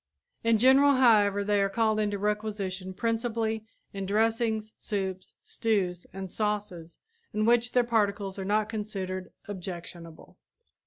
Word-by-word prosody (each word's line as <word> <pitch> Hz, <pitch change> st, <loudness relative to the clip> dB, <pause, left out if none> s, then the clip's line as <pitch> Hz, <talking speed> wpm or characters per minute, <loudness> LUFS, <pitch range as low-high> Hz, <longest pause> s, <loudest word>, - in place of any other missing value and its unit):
In 230 Hz, -1 st, +4 dB
general, 270 Hz, +4 st, +6 dB
however, 205 Hz, -5 st, +4 dB
they 205 Hz, 0 st, +2 dB
are 195 Hz, -, +2 dB
called 220 Hz, 0 st, +1 dB
into 205 Hz, -1 st, 0 dB
requisition 205 Hz, -3 st, -2 dB
principally 225 Hz, +1 st, -1 dB, 0.3 s
in 195 Hz, -1 st, -4 dB
dressings, 220 Hz, +1 st, 0 dB
soups, 190 Hz, -3 st, -4 dB
stews 185 Hz, -6 st, -1 dB
and 190 Hz, -1 st, -7 dB
sauces 205 Hz, -6 st, -3 dB, 0.4 s
in 215 Hz, 0 st, +1 dB
which 240 Hz, +1 st, +3 dB
their 245 Hz, -, +4 dB
particles 205 Hz, -4 st, 0 dB
are -, -, -3 dB
not 210 Hz, +2 st, +1 dB
considered 195 Hz, -4 st, -4 dB, 0.2 s
objectionable. 175 Hz, -4 st, -8 dB
210 Hz, 125 wpm, -28 LUFS, 190-225 Hz, 0.4 s, general